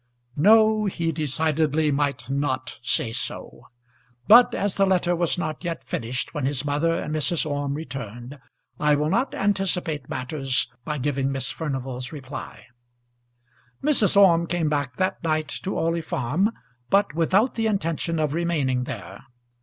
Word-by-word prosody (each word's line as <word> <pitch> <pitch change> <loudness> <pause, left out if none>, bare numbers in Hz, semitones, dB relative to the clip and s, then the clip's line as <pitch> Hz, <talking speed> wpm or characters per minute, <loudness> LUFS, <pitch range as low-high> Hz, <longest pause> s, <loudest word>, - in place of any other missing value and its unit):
No; 215 +5 +5
he 170 -4 -1
decidedly 155 0 0
might 140 -4 -1
not 135 -1 -2
say 120 -2 0
so. 120 0 -6 0.6
But 240 +3 +7
as 200 -1 0
the 195 -1 +2
letter 180 -2 +2
was 170 0 0
not 155 -2 -4
yet 170 -2 -4
finished 120 +2 -3
when 145 -3 -1
his 140 0 -2
mother 150 +3 +1
and 155 - -3
Mrs. 155 +2 0
Orme 145 -1 -2
returned, 125 -2 -7 0.4
I 150 0 +3
will 150 +2 0
not 245 +7 0
anticipate 180 -8 -1
matters 130 -1 -1 0.2
by 150 +2 -3
giving 135 0 -1
Miss 135 -2 -1
Furnival's 130 -5 -4
reply. 140 -3 -8 1.2
Mrs. 260 -10 +3
Orme 170 -4 +6
came 170 -3 0
back 145 -4 -1
that 185 +3 -1
night 155 -2 0
to 195 - -3
Orley 165 +1 0
Farm, 155 - 0 0.4
but 200 -4 +3
without 190 - +2
the 225 -1 0
intention 165 -5 -1
of 155 -2 0
remaining 150 -7 0
there. 95 0 -8
155 Hz, 145 wpm, -24 LUFS, 135-175 Hz, 1.2 s, But